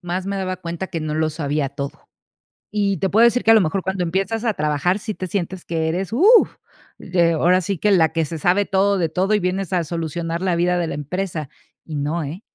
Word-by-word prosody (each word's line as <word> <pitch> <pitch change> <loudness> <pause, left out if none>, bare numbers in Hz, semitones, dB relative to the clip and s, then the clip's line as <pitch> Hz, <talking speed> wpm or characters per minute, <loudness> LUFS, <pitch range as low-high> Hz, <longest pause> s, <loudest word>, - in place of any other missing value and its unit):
más 180 +1 -3
me 200 - -2
daba 185 -1 -2
cuenta 170 0 -5
que 170 -3 -5
no 155 -1 -3
lo 155 0 +1
sabía 145 -2 -2
todo. 140 0 -7 0.6
Y 200 -3 0
te 190 - 0
puedo 225 +3 +5
decir 235 +1 +3
que, 225 - +5
a 225 - +9
lo 220 - +6
mejor, 185 +2 0
cuando 190 -1 -2
empiezas 195 +6 -1
a 220 -3 +1
trabajar, 150 +6 0
sí 215 +1 -4
te 185 - -5
sientes 180 0 -4
que 160 -1 -1
eres, 185 +5 -2
uh, 415 - +6 0.5
eh, 170 -2 +2
ahora 180 +3 +3
sí 190 0 -3
que 210 - +2
la 165 -5 +4
que 165 -1 0
se 160 +2 -5
sabe 180 +6 +2
todo 200 +1 +2
de 170 -3 0
todo 190 +5 +1
y 210 - +2
vienes 185 0 -2
a 175 -2 +1
solucionar 165 +1 -3
la 185 -2 0
vida 180 +1 +1
de 170 - 0
la - - -4
empresa, 155 0 -4 0.4
y 155 -2 -6
no, 150 +4 -1
eh, 155 +8 -6
180 Hz, 240 wpm, -21 LUFS, 160-195 Hz, 0.6 s, a